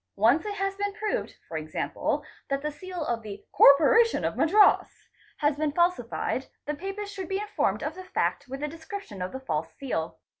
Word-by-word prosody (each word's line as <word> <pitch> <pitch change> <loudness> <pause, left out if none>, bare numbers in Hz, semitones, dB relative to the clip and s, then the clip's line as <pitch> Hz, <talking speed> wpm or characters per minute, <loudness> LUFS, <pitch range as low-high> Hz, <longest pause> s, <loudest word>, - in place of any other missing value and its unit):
Once 240 - +3
it 410 - -3
has 390 0 -1
been 405 0 -1
proved, 430 0 -3 0.2
e. 155 -1 -4
q., - - -1 0.3
that 275 0 -1
the 300 - -1
seal 355 +2 -6
of 235 -3 -1
the 205 -2 -9
'' - - -54
Corporation 390 +12 +6
of - - -1
Madras'' 400 +6 +4 0.3
has 295 -1 +1
been 305 -1 0
falsified, 285 -6 0 0.2
the 295 - -1
papers 390 +5 -5
should 380 -3 -6
be 385 - 0
informed 295 - -1
of 300 +2 -2
the 370 +2 -9
fact 370 - -1
with 270 +3 -6
a - - 0
description 320 - -8
of 180 - -3
the 265 - -5
false 160 -12 -3
seal. 170 -12 -3
305 Hz, 195 wpm, -27 LUFS, 260-390 Hz, 0.3 s, Corporation